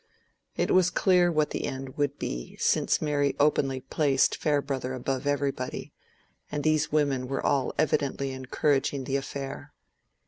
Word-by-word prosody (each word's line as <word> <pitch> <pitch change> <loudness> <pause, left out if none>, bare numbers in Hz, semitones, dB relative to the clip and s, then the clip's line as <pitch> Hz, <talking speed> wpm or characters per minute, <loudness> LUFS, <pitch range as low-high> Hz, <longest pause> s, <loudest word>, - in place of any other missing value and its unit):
It - - +1
was 185 -1 +5
clear 180 -1 +3
what 155 -2 +1
the - - -2
end 135 -1 -5
would 145 -1 -1
be, - - -5
since - - +2
Mary 145 -2 +1
openly 135 -3 +2
placed 135 0 +2
Farebrother 140 -3 -1
above 130 +2 -2
everybody, 140 -3 -2 0.6
and 145 -1 -2
these 155 -1 +2
women 140 -4 +1
were 135 +1 -3
all 135 -2 +2
evidently 140 -3 0
encouraging 135 +1 0
the 135 +1 -1
affair. 140 +1 -6
140 Hz, 140 wpm, -27 LUFS, 135-150 Hz, 0.6 s, was